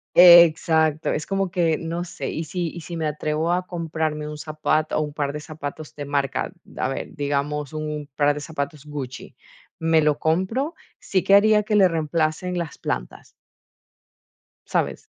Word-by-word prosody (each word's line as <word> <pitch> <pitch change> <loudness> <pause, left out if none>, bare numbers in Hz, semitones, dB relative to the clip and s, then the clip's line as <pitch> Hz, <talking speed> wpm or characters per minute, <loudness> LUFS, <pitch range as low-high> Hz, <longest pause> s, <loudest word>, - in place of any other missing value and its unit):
Exacto. 165 -3 +6
Es 150 - -3
como 195 -1 -1
que, 170 -3 +1
no 165 +2 -3
sé, 175 - -5
y 160 - -3
si 175 +1 -3
y 170 - -8
si 170 +1 -7
me 160 -1 -2
atrevo 155 +2 -1
a 180 0 0
comprarme 160 -3 -3
un 150 0 -7
zapato 155 0 -1
o - - +1
un 150 - -4
par 145 -1 -2
de 150 - -5
zapatos 150 0 -7
de 145 - -6
marca 140 -2 -1
de, - - -11
a - - +1
ver, 135 - -5
digamos, 145 0 -2
un 150 -1 -4
par 145 0 +3
de 150 - -5
zapatos 150 -1 -5
Gucci, 140 -4 -7 0.4
me 160 -1 +3
lo 150 -1 +2
compro, 190 - 0 0.2
sí 185 -2 0
que 195 - +4
haría 210 +1 +6
que 210 0 0
le 195 -2 +6
reemplacen 165 +2 -1
las 170 -3 -5
plantas. - - -4 1.4
¿Sabes? - - -1
155 Hz, 175 wpm, -23 LUFS, 150-175 Hz, 1.4 s, Exacto